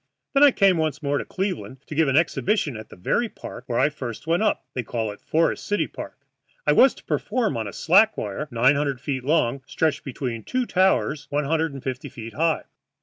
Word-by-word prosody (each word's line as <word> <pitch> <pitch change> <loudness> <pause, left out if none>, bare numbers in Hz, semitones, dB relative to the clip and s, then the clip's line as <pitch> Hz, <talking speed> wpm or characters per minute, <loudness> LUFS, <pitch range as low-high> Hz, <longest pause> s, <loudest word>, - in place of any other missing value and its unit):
Then 275 - +4
I 290 - +10
came 195 -8 +3
once 155 -2 -1
more 140 0 +1
to - - -5
Cleveland 185 -8 -4
to - - -8
give 160 0 +3
an 135 +1 +3
exhibition 170 - +1
at 110 0 -9
the - - -12
very 225 - 0
park 125 - -10
where 120 -3 -1
I - - +4
first 130 -5 -7
went 170 +3 +1
up 215 - +1
they 125 - -1
call 110 -2 -3
it 105 - -12
Forest 165 +1 0
City 205 - +1
Park. - - -10 0.4
I - - +4
was - - +6
to - - -16
perform 240 -5 -1
on 110 -2 -2
a - - -5
slack 200 - +4
wire 105 +9 -4
nine 125 +2 +4
hundred 140 -2 -1
feet 130 -1 -3
long, 140 -3 +1
stretched 160 -2 0
between 125 -4 -4
two 255 -1 -1
towers 185 -7 +1
one 145 +1 0
hundred 160 +2 +1
and 135 - -8
fifty 130 -1 -4
feet 115 -4 -9
high. 160 +1 +1
145 Hz, 220 wpm, -24 LUFS, 125-170 Hz, 0.4 s, I